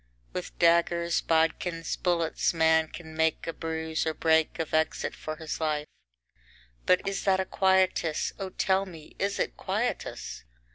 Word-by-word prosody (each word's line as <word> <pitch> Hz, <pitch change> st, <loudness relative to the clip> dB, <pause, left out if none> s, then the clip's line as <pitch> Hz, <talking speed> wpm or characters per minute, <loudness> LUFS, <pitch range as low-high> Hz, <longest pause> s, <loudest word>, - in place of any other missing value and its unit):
With -, -, -6 dB
daggers, 170 Hz, 0 st, +3 dB
bodkins, 165 Hz, +1 st, 0 dB
bullets, 170 Hz, -1 st, 0 dB
man 160 Hz, 0 st, +4 dB
can 160 Hz, -1 st, -10 dB
make 160 Hz, 0 st, +1 dB
a 165 Hz, -, -3 dB
bruise 160 Hz, -1 st, -2 dB
or 160 Hz, -, -1 dB
break 160 Hz, -1 st, +2 dB
of 160 Hz, -, -4 dB
exit 155 Hz, 0 st, +1 dB
for 155 Hz, -, -6 dB
his 160 Hz, 0 st, -5 dB
life; 150 Hz, -1 st, 0 dB, 1.0 s
but 185 Hz, +1 st, +3 dB
is 195 Hz, 0 st, -2 dB
that 190 Hz, -1 st, +3 dB
a 190 Hz, -, 0 dB
quietus, 185 Hz, -5 st, +2 dB
O 195 Hz, -1 st, -3 dB
tell 190 Hz, +1 st, +1 dB
me, 160 Hz, -4 st, -12 dB
is 200 Hz, +1 st, 0 dB
it -, -, -1 dB
quietus? -, -, -3 dB
165 Hz, 150 wpm, -28 LUFS, 160-180 Hz, 1.0 s, man